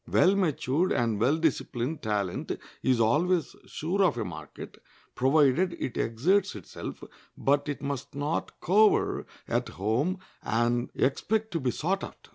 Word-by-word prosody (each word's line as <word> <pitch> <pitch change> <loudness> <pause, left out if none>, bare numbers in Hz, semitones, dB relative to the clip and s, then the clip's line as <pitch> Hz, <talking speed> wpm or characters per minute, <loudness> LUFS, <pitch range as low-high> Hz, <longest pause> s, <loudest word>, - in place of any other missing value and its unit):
Well 190 +2 +4
matured 165 -2 +1
and 115 -3 0
well 135 +8 +3
disciplined 150 -3 -1
talent 100 -4 -2 0.2
is 130 -2 +2
always 160 +10 +2
sure 180 +6 -1
of 180 - +2
a 115 - -2
market, 90 - -9 0.3
provided 150 +6 +3
it 130 -7 -4
exerts 180 - +1
itself; 100 - -8 0.3
but 145 +1 +1
it 145 - -4
must 140 -1 -4
not 145 +3 -2
cower 210 +4 +3 0.2
at - - -1
home 120 - 0 0.2
and 120 +2 0
expect 220 +11 0
to 165 - -1
be 130 -3 0
sought 180 +10 -1
after. - - -10
145 Hz, 140 wpm, -28 LUFS, 120-180 Hz, 0.3 s, Well